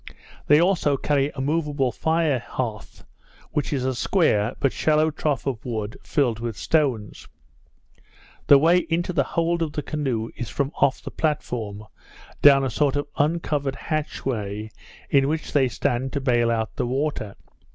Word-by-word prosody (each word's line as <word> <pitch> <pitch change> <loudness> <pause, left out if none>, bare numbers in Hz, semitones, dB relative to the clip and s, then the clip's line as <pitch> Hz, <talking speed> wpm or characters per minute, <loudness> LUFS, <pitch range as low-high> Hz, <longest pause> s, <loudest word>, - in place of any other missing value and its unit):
They 150 +1 +6
also 170 -5 +2
carry 140 0 +1
a 135 - -3
moveable 145 -3 0
fire 160 0 +1
hearth, 115 -3 -6 0.5
which 150 -1 -1
is 135 -3 -1
a 130 - 0
square, 120 - +1
but 135 - +1
shallow 155 0 +2
trough 150 -2 -2
of 130 -5 -3
wood, 110 -1 -4
filled 120 -6 0
with 115 -3 -4
stones. 130 -10 -1 1.2
The 140 - +9
way 165 +5 +5
into 175 +2 0
the - - +3 0.2
hold 170 0 +1
of 155 -2 -1
the 150 - -3
canoe 130 -8 -2
is 120 - -5
from 140 0 -2
off 135 - +2
the - - -7
platform, 115 -9 -2 0.6
down 140 -1 +7
a 130 - -1
sort 140 +2 +1
of 145 - -1
uncovered 145 -3 0
hatchway, 110 -9 -3 0.4
in 135 -1 +4
which 155 +2 -3
they 135 -3 +4
stand 125 +2 -2
to 140 - 0
bale 120 -3 +2
out 110 -1 -2
the - - -1
water. 130 -6 -2
140 Hz, 160 wpm, -24 LUFS, 120-150 Hz, 1.2 s, The